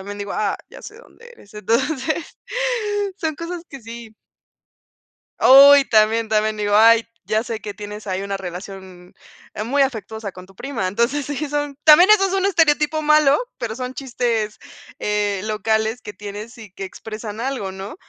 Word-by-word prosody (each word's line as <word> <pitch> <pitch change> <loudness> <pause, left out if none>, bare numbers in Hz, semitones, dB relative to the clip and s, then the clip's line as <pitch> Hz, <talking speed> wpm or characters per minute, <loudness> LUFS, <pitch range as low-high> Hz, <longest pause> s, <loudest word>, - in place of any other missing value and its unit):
también 205 +1 -8
digo: 200 0 -5
"¡Ah!, 205 -2 -1
ya - - -12
sé 425 - -10
dónde 475 -1 -17
eres". 205 - -19
Entonces 265 - -2 0.8
son 315 -4 -3
cosas 335 0 -6
que 275 -2 -10
sí. 230 -1 -10 1.3
Oh, 275 +2 +9
y 280 -1 +4
también 220 +1 +3
también 215 0 0
digo: 205 0 0
"Ay, 230 +1 +6 0.2
ya 215 +1 0
sé 220 -3 -5
que 205 -1 -6
tienes 210 +1 -9
ahí 190 +1 -2
una 200 0 -3
relación, 185 -1 -9 0.4
eh, 210 - -4
muy 275 +5 +1
afectuosa 220 -5 -5
con 185 0 -11
tu 195 - -20
prima". 235 -1 -4
Entonces, 235 +8 0
sí 290 +1 -4
son 290 -1 -3
también 345 +6 +8
eso 390 -2 +6
es 385 - -4
un 385 0 +1
estereotipo 310 -4 +2
malo, 300 -2 +4 0.2
pero 225 -2 -4
son 255 +1 -5
chistes, 240 -6 -2 0.4
eh, 205 -2 -1
locales 220 +2 -1
que 210 - -8
tienes 210 +5 -9
y 215 -4 -12
que 195 - -8
expresan 215 +2 -8
algo, 240 -6 -3
¿no?, 195 +7 -8
225 Hz, 170 wpm, -20 LUFS, 205-280 Hz, 1.3 s, Oh